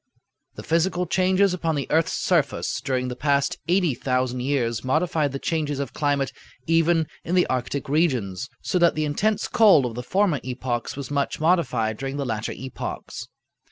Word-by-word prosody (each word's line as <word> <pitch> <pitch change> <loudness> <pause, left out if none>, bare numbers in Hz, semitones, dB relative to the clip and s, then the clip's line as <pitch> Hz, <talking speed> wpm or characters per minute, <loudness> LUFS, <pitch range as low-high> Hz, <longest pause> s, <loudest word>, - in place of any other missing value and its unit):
The - - -8
physical 175 +2 +1
changes 185 +2 +2
upon 165 -3 -1
the 140 - -2
earth's 165 +1 +2
surface 170 -6 0
during 130 -2 -1
the 125 - -4
past 140 +1 0
80,000 130 -8 +1
years 125 -4 -1
modified 155 +1 +1
the 135 - -3
changes 150 -1 -2
of 140 -4 -4
climate 145 -2 0 0.3
even 165 0 +3 0.2
in 175 - -1
the 180 - +4
Arctic 130 +2 -2
regions, 130 - 0
so 180 - 0
that 170 -1 +4
the 155 0 0
intense 210 +9 0
cold 210 - +5
of 120 - -3
the 120 - -5
former 185 +1 +1
epochs 125 -1 -3
was 140 0 -6
much 140 -1 -1
modified 125 -10 +1
during 135 +1 -4
the 140 - -2
latter 110 -3 -3
epochs." 130 0 -6
145 Hz, 165 wpm, -24 LUFS, 130-170 Hz, 0.3 s, cold